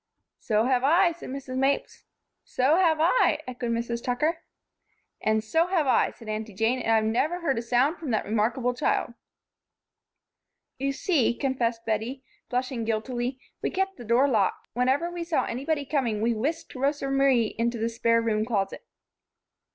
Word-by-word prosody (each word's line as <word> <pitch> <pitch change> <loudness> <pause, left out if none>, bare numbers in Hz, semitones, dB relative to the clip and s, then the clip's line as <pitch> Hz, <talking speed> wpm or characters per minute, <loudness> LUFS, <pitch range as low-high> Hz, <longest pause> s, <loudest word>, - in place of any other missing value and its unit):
"So 215 0 +1
have 255 -1 +2
I," 340 +5 +4
said 340 - -9
Mrs. 260 -1 -5
Mapes. 275 +1 -1 0.4
"So 270 +6 +2
have 335 -4 +3
I," 345 +10 +3
echoed 245 -1 -4
Mrs. 235 0 -2
Tucker. 300 +7 0 0.8
"And 215 0 +1
so 325 +10 +2
have 355 -5 +1
I," 260 - +3
added 230 - -12
Aunty 215 -1 -4
Jane, 225 +5 +1
"and 225 - -1
I've 220 -1 +4
never 290 +11 0
heard 275 -7 0
a - - -2
sound 250 +7 +1
from 310 - -6
that 220 -3 0
remarkable 230 +4 0
child." 250 -2 0 1.7
"You 275 +1 0
see," 275 -4 +1
confessed 240 -4 -1
Bettie, 225 +5 -2 0.3
flushing 250 -1 -2
guiltily, 240 +3 -2 0.2
"we - - 0
kept 385 0 -2
the - - -9
door 240 +5 +3
locked. 215 -8 0
Whenever 265 +8 +1
we 345 -1 -4
saw 335 -2 0
anybody 285 +4 -2
coming 255 -7 0
we 230 +2 +1
whisked 285 +9 -3
Rosa 275 +1 -1
Marie 270 -5 +3
into 235 +1 0
the 225 +1 -1
spare 230 0 +1
room 215 -1 +1
closet." 210 -4 -2
250 Hz, 165 wpm, -26 LUFS, 230-280 Hz, 1.7 s, I